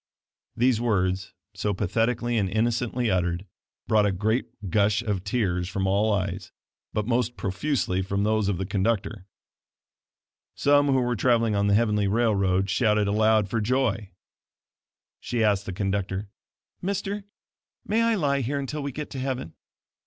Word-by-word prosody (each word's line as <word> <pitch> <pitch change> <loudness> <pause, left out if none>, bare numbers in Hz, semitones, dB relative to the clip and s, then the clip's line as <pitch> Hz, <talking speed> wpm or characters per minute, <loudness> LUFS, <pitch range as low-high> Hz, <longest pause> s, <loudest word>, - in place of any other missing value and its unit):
These 120 -1 +3
words, 95 -5 0 0.2
so 105 -2 -2
pathetically 115 +5 0
and 100 -4 +1
innocently 120 +2 0
uttered, 90 0 0 0.4
brought 105 -1 +4
a - - +1
great 110 +6 0 0.2
gush 105 +1 +2
of 100 -4 -2
tears 95 -5 -1
from 95 +1 -2
all 100 +3 +2
eyes, 95 -2 -2 0.4
but 105 - -1
most 120 0 0
profusely 95 -1 -1
from 100 +1 -1
those 110 -1 +1
of 100 - 0
the 95 - -3
conductor. 100 0 -1 1.3
Some 145 0 +4
who 135 -2 +3
were 120 0 0
traveling 115 -1 +2
on 100 0 +1
the 100 - +4
heavenly 105 -2 +2
railroad 100 -3 +2
shouted 105 +1 +2
aloud 110 0 +3
for 115 +3 -1
joy. 115 -3 0 1.1
She 120 -1 -1
asked 105 -2 +1
the - - -2
conductor: 95 +1 -2 0.5
"Mister, 200 +2 -2 0.6
may 220 +2 +1
I 230 0 +3
lie 140 -7 +1
here 135 +4 -2
until 140 +2 -3
we 140 0 -3
get 150 +3 -6
to 135 - -5
heaven?" 130 -9 -3
105 Hz, 150 wpm, -26 LUFS, 100-120 Hz, 1.3 s, brought